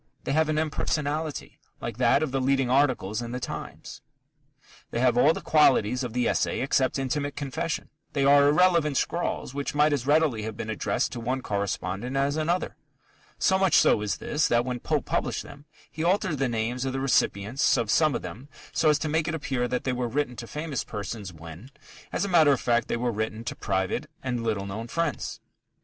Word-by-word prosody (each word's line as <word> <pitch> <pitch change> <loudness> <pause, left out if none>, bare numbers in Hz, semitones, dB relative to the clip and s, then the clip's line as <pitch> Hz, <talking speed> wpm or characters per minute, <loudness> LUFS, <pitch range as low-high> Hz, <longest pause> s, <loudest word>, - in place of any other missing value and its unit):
They - - -2
have 155 +2 +2
an 155 - 0
impersonality, 155 0 -2 0.2
like - - -5
that 140 - +3
of 150 - -2
the 135 0 0
leading 135 -1 +1
articles 125 -6 +2
in 120 0 -5
The 125 - -3
Times. - - -7 0.9
They 115 - -3
have 125 -1 +3
all 140 +5 +5
the - - -4
qualities 125 -5 +3
of 120 -3 -4
the 125 0 +1
essay - - 0
except 130 0 +1
intimate 145 +2 -2
confession. 145 +3 -3 0.2
They 140 -2 +1
are 140 0 +6
irrelevant 155 -2 +3
scrawls 170 -6 -2
which 140 +1 -3
might 150 +1 +4
as 135 -2 -2
readily 150 -6 +3
have 110 0 -5
been 110 - -4
addressed 110 - -1
to - - -5
one 125 +3 -2
correspondent 100 +4 -2
as 140 +1 +1
another. 165 +3 -1 0.6
So 190 -1 +2
much 190 -2 +3
so - - +5
is 105 -1 -1
this, 150 0 0
that 120 0 +2
when 125 -1 -3
Pope - - -1
published - - -1
them, 140 +1 -13 0.3
he 160 - -4
altered 180 -4 +1
the 135 -2 +1
names 120 +2 -2
of 135 -1 -2
the 135 - -2
recipients 130 -1 +2
of 115 -3 0
some 155 -5 +3
of - - -3
them 105 +11 -8 0.2
so 155 - +2
as 150 - +4
to 155 - -3
make 160 +1 0
it 160 - -1
appear 130 -5 -1
that 125 +1 -2
they 130 - -1
were 125 -1 -1
written 125 +1 -1
to 115 - -7
famous 150 -2 -3
persons 105 -2 -6
when, 85 - -11 0.4
as - - -1
a - - -2
matter 165 -6 +5
of 135 - +2
fact, 120 -1 +1
they - - -1
were 120 0 0
written 110 +1 -3
to 115 - -4
private 95 -2 -2
and 125 -3 -2
little 105 -4 -1
known 105 +4 -5
friends. 165 +1 -2
130 Hz, 205 wpm, -26 LUFS, 115-150 Hz, 0.9 s, are